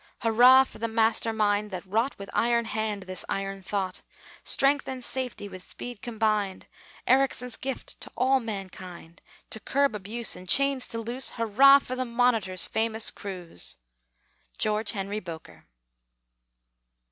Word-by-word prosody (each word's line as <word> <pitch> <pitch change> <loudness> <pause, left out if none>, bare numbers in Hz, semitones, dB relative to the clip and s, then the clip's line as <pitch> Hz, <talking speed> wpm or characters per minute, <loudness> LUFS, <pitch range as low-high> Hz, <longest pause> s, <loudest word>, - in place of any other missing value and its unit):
Hurrah 245 +4 +7
for - - -13
the 230 - -1
master 225 0 +2
mind 210 -1 +1
that 185 -1 -6
wrought, 225 +8 0
With 200 0 -9
iron 235 0 +2
hand, 215 -2 -2
this 185 0 -5
iron 195 0 -3
thought! 190 0 -3 0.4
Strength 280 +1 +3
and 255 -2 -4
safety 255 -5 -2
with 185 -2 -10
speed 245 +3 -7
combined, 215 -5 -1 0.4
Ericsson's 260 -2 +2
gift 265 -1 -6
to - - -6
all 265 +1 +3
mankind; 185 -6 -8 0.3
To 220 - -4
curb 280 +3 +1
abuse, 215 +3 -2
and 180 0 -11
chains 275 +1 +3
to 230 - -3
loose, 240 +4 -2
Hurrah 245 +5 +7
for 255 -2 -5
the 255 0 -2
Monitor's 230 -7 +1
famous 220 0 0
cruise! 180 - -6 0.8
GEORGE 215 +1 0
HENRY 200 0 -3
BOKER. 165 -5 -10
220 Hz, 140 wpm, -27 LUFS, 195-250 Hz, 0.8 s, Hurrah